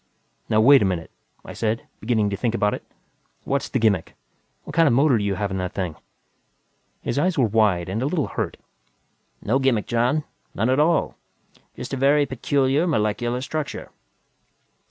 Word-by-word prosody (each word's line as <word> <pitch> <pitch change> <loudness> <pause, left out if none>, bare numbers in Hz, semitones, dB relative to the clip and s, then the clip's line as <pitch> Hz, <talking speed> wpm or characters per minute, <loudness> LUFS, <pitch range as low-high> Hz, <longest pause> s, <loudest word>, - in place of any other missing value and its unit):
"Now 110 - +3
wait 140 +4 +7
a - - +3
minute," 90 -4 -2 0.3
I - - -8
said, 115 0 -2
beginning 110 -2 0
to - - -1
think 115 +3 -1
about 105 -2 +1
it. - - -5 0.6
"What's 140 0 -1
the - - 0
gimmick? 105 -8 +1 0.5
What 150 - -9
kind 165 -1 +5
of 120 - +3
motor 140 0 +4
do - - -2
you 100 -1 0
have 100 +1 -2
in 95 - -2
that 90 -1 -3
thing?" 90 -6 -3 1.1
His - - -1
eyes 180 +2 +1
were 130 - +4
wide 105 -5 +2
and 100 +5 -3
a 135 - 0
little 155 -3 -1
hurt. - - -3 0.9
"No 125 +6 +1
gimmick, 130 -6 +1
John. 125 +6 +1 0.3
None 110 +6 +1
at 130 - +2
all. 165 +2 +2 0.6
Just - - -7
a - - -1
very 140 +2 +4
peculiar 135 +4 +1
molecular 120 -2 0
structure." 150 +2 -5
120 Hz, 175 wpm, -23 LUFS, 105-140 Hz, 1.1 s, wait